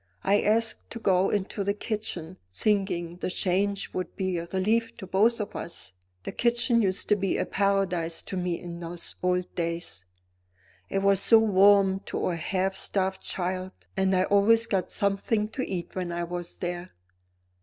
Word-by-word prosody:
I 205 +1 +3
asked 225 +2 +1
to 230 - -7
go 190 -3 +3
into 200 0 -1
the 200 +1 0
kitchen, 205 -6 -4
thinking 180 - 0
the 180 - -3
change 195 +2 0
would 185 -2 -4
be 185 -3 -1
a 170 - -6
relief 220 +4 +1
to - - -7
both 215 +6 +3
of 210 - -4
us. 165 - -5 0.3
The - - -4
kitchen 240 0 +2
used 190 -2 0
to 210 - +6
be 195 -2 0
a - - 0
paradise 190 -4 0
to - - -6
me 180 -2 -1
in 170 -1 -7
those 170 0 -6
old 180 0 0
days; 170 - -3 0.9
it 195 - -1
was 195 -1 +4
so 225 +3 +6
warm 200 -2 +5
to - - -1
a 175 - -1
half 190 +3 -1
starved 190 0 0
child 185 +1 -3 0.2
and 190 0 +2
I 185 - +3
always 210 +4 +4
got 190 -5 -1
something 200 +2 0
to 255 - -4
eat 180 -3 -4
when 180 -2 -2
I 170 0 -2
was 175 0 -5
there. 175 +1 -5
190 Hz, 175 wpm, -27 LUFS, 180-205 Hz, 0.9 s, to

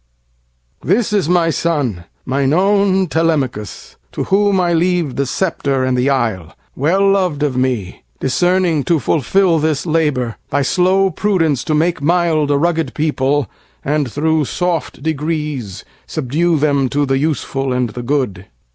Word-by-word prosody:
This 210 +4 +1
is 190 -6 +1
my 170 -2 +3
son, 140 - -1 0.2
mine 135 +2 0
own 195 +1 +3
Telemachus, 150 - -2 0.2
To - - -2
whom 200 0 +2
I 175 -1 +1
leave 170 -4 0
the 140 -1 -1
sceptre 140 -6 -1
and 130 0 +1
the 125 +2 +1
isle—Well 135 - -1
lov'd 180 -7 0
of 140 -4 0
me, 125 -7 -2 0.2
discerning 175 +2 +1
to 170 - +2
fulfilThis 160 +2 +1
labor, 150 -8 0
by 145 - +1
slow 190 +5 +2
prudence 165 - 0
to 155 - 0
make 165 +1 0
mildA 155 -3 +2
rugged 165 0 0
people, 145 -3 0 0.4
and 145 -3 0
thro' 160 +2 +1
soft 175 +4 -3
degreesSubdue 150 - -2
them 140 -3 +1
to 145 +2 0
the 135 0 0
useful 135 -3 -2
and 125 -2 -1
the 120 - -6
good. 120 -8 -2
150 Hz, 135 wpm, -17 LUFS, 135-175 Hz, 0.4 s, my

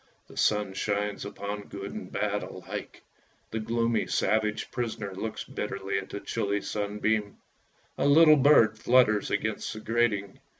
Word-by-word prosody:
The - - -13
sun 105 -2 +1
shines 105 +1 -2
upon 100 0 -6
good 100 0 -7
and - - -7
bad - - -1
alike! - - -7 0.5
The 110 - -2
gloomy, 115 +1 0
savage 110 +1 0
prisoner 110 -5 -3
looks 110 +4 -4
bitterly 100 0 -3
at 95 - -9
the 100 - -5
chilly 100 -2 -1
sunbeam. 105 0 -1 0.6
A - - +3
little 155 +1 +7
bird 115 -6 +5
flutters 115 -4 +4
against 105 +1 -2
the 110 - -7
grating. 110 -3 0
105 Hz, 140 wpm, -28 LUFS, 100-115 Hz, 0.6 s, little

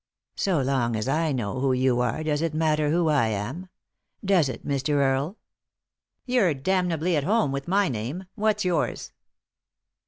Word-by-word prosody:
" - - -67
So 185 -6 +1
long 130 -3 0
as 110 +2 -2
I 155 +3 +1
know 125 -2 -2
who 135 0 +2
you 130 -1 +2
are, 125 +5 -1
does 150 -1 0
it 165 -2 -1
matter 155 -1 +1
who 165 +1 +2
I 145 -7 +3
am? 115 - -4 0.3
— - - -20
does 180 -8 +3
it, - - -7
Mr. 140 +1 -1
Earle? 140 +7 +1 0.3
" - - -65
" - - -58
You're 240 - +2
damnably 175 +2 0
at 145 - +1
home 210 -3 +2
with 140 0 -4
my 195 +2 +2
name; 130 - -4
what's 215 -2 0
yours?" 180 -2 -1
150 Hz, 185 wpm, -25 LUFS, 130-180 Hz, 0.3 s, I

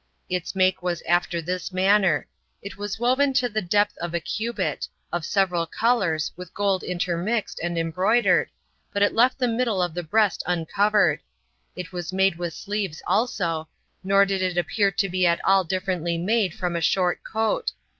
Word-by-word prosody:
Its 180 0 -3
make 185 -1 +2
was 175 -2 -2
after 175 -1 0
this 180 +2 -3
manner: 190 -3 +3 0.4
it 200 - -7
was 205 +1 -5
woven 260 +3 +2
to 250 -1 +2
the 215 -2 -2
depth 205 +3 +1
of 175 0 -4
a - - +1
cubit, 225 +7 -3 0.2
of 175 -1 -2
several 180 -2 +1
colors, 185 -7 +1
with 180 0 -11
gold 200 -2 +1
intermixed, 180 +5 -2
and 175 0 -2
embroidered, 185 +8 +2 0.4
but 200 - +1
it 205 - +2
left 250 +3 +3
the 255 -2 +1
middle 230 -3 0
of 175 -2 0
the 175 - -3
breast 205 +5 +1
uncovered: 180 0 +2 0.6
it 180 -2 -7
was 175 -1 -4
made 190 -2 +2
with 170 -2 -4
sleeves 200 -6 -4
also; 170 -9 0 0.4
nor 195 +1 +4
did 195 -1 -1
it 180 -1 -1
appear 200 +3 +2
to 195 +1 0
be 185 -1 +1
at 170 0 +2
all 195 0 +4
differently 180 -1 -2
made 200 +2 +1
from 180 -2 -2
a 170 - -1
short 180 +2 +1
coat. 220 - -1
185 Hz, 175 wpm, -24 LUFS, 175-205 Hz, 0.6 s, nor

